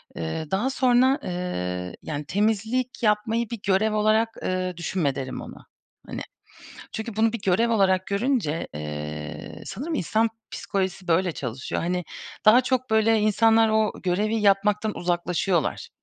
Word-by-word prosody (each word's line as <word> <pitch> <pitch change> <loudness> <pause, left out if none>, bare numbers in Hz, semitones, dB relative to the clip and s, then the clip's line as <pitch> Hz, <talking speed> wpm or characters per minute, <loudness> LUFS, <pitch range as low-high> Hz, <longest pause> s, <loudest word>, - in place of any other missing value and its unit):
Iıı, 85 - -4
daha 210 +8 +1
sonra, 260 +1 +3
ııı, 90 - -3
yani 150 -1 -4
temizlik 220 - 0
yapmayı 220 +2 +1
bir 235 -3 -5
görev 210 +3 +3
olarak, 215 +2 +2
ııı, 185 -1 -2
düşünme 170 -5 -1
derim 130 -1 -5
ona. - - -11 0.4
Hani, - - -5 0.7
çünkü 220 -1 -5
bunu 225 +1 +2
bir 235 - -4
görev 195 +6 +2
olarak 190 -3 +2
görünce, 200 - 0
ııı, 75 0 -6
sanırım 305 +10 -4
insan 220 - +1 0.2
psikolojisi 190 -2 -3
böyle 175 +1 +2
çalışıyor. 130 -2 -4
Hani, 180 +1 -1 0.4
daha 235 +4 +8
çok 255 0 -1
böyle 220 0 +4
insanlar 225 +1 +4
o 220 -1 +2
görevi 205 +5 +1
yapmaktan 210 +1 +2
uzaklaşıyorlar. 175 -1 0
205 Hz, 135 wpm, -25 LUFS, 175-225 Hz, 0.7 s, daha